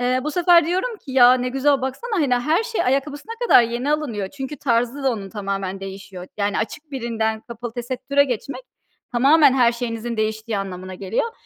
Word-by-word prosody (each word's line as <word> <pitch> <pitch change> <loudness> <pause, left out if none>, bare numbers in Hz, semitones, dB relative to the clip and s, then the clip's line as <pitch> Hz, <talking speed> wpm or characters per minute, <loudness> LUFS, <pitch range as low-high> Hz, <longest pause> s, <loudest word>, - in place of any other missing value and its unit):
Eee, 250 +1 +1
bu 305 - -1
sefer 345 0 +4
diyorum 380 +8 -1
ki: 280 -9 -11
"Ya, 250 -1 +7
ne 250 0 -1
güzel 270 +2 +2
baksana, 265 - -4
hani, 260 -4 +2
her 305 - +1
şey 460 0 -2
ayakkabısına 285 - -1
kadar 245 - +7
yeni 240 +5 -1
alınıyor." 235 -11 -2
Çünkü 280 +3 -7
tarzı 245 +1 0
da 270 - +2
onun 200 -4 -6
tamamen 195 -2 -4
değişiyor. 195 -1 -8
Yani 205 0 0
açık 285 +7 -5
birinden 225 -4 -2
kapalı 235 0 -8
tesettüre 255 +4 0
geçmek 255 +1 -4 0.5
tamamen 280 +4 +5
her 245 -3 +4
şeyinizin 235 -1 -4
değiştiği 220 0 -2
anlamına 185 -1 -6
geliyor. 200 - -2
245 Hz, 180 wpm, -21 LUFS, 220-285 Hz, 0.5 s, Ya